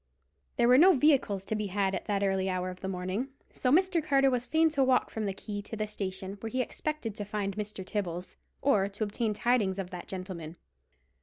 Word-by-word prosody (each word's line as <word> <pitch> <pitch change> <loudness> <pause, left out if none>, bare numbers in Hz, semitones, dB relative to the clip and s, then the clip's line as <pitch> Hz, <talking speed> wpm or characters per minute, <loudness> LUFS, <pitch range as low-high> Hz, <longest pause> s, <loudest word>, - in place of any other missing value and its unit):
There 235 - +3
were 250 +2 +7
no 365 +2 +7
vehicles 260 -9 +3
to - - -2
be 210 -1 -1
had 195 0 0
at - - -3
that 200 -1 0
early 190 -1 +1
hour 185 0 -1
of 180 - -11
the 190 - -3
morning, 185 +6 -2 0.3
so 250 - 0
Mr. 355 +1 +3
Carter 275 -2 +4
was 245 -1 -1
fain 320 0 +4
to 285 -3 +2
walk 260 -1 +2
from 215 -2 -2
the - - 0
quay 205 +1 -6
to 215 - -7
the 215 0 -1
station, 195 -1 -4
where 225 - -5
he 255 - -2
expected 280 -2 -2
to 210 0 -5
find 205 -1 -3
Mr. 210 -2 -5
Tibbles, 180 -3 -3 0.3
or 205 -8 +3
to 205 +2 -3
obtain 215 +1 -1
tidings 215 -5 +2
of 190 -2 -4
that 180 -1 -7
gentleman. 180 -4 -6
210 Hz, 220 wpm, -30 LUFS, 190-250 Hz, 0.3 s, were